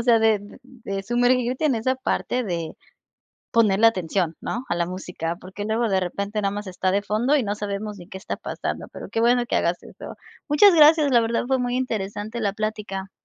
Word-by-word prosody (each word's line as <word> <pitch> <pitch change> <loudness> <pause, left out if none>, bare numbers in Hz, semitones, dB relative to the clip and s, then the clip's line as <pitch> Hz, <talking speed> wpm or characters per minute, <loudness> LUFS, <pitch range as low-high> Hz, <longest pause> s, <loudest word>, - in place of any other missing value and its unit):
o - - -1
sea, 235 -1 +5
de 220 -1 +3
d 205 - -13
de 230 -6 -6
sumergirte 245 +4 +1
en 285 -5 +3
esa 255 +4 0
parte 255 -1 -1
de 170 -4 -4 0.8
ponerle 220 -1 +4
atención, 180 -5 0
¿no? 240 +2 -4
A - - 0
la 170 0 0
música, 175 -2 -4
porque, 190 +2 -7
luego 225 +2 0
de 190 -2 +2
repente 200 +4 -3
nada 195 - +1
más 205 0 -5
está 185 0 -1
de 200 - +1
fondo 230 +8 +1
y 270 - +2
no 205 -1 -2
sabemos 205 0 -4
ni 175 - -12
qué 190 - -8
está 190 - -5
pasando, - - -5
pero, - - -8
qué 225 - -2
bueno 240 +1 +3
que - - 0
hagas 170 +1 0
eso. - - -10 0.3
Muchas 345 +6 +6
gracias, 305 -2 +6
la 240 -2 +5
verdad 230 +1 0
fue 265 0 +1
muy 245 0 -1
interesante 220 -2 -3
la 205 -3 0
plática. 205 -2 -4
215 Hz, 215 wpm, -23 LUFS, 195-245 Hz, 0.8 s, Muchas